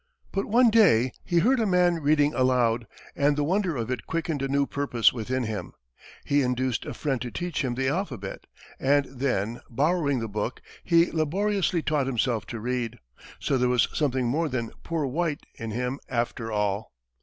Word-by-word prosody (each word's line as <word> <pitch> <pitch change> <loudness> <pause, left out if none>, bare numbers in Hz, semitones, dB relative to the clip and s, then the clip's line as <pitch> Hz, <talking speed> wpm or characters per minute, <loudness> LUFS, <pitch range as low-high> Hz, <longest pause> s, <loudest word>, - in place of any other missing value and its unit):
But 195 - -1
one 235 +2 +5
day, 130 - +5
he 175 - 0
heard 250 +9 +4
a 220 - +2
man 180 -3 +3
reading 150 0 +3
aloud, 120 -3 +2 0.3
and 145 +1 +3
the 145 - +1
wonder 180 -1 0
of 115 +1 -3
it 125 - -4
quickened 160 -3 -2
a 135 - 0
new 140 +1 +2
purpose 135 -5 +2
within 125 +2 -2
him. 105 -6 -4 0.5
He 145 0 +3
induced 125 -1 -1
a - - -5
friend 135 -5 -1
to 125 - -3
teach 175 +3 -3
him 125 -2 -1
the 130 +1 0
alphabet, 135 - -3 0.3
and 140 +1 +3
then, 120 -5 -2
borrowing 145 +2 +1
the 115 -2 -2
book, 105 +3 -3 0.2
he 170 -1 +4
laboriously 180 +2 0
taught 150 -3 +1
himself 120 -4 0
to 115 - -5
read. 120 0 -2 0.4
So 135 - 0
there 125 0 +2
was 125 -2 +3
something 130 -4 0
more 155 +7 0
than 120 -3 -3
"poor 165 -3 -2
white" 150 +3 -2
in 115 - -5
him, 125 +5 -2
after 120 -2 -2
all. 105 0 -1
135 Hz, 180 wpm, -26 LUFS, 120-160 Hz, 0.5 s, one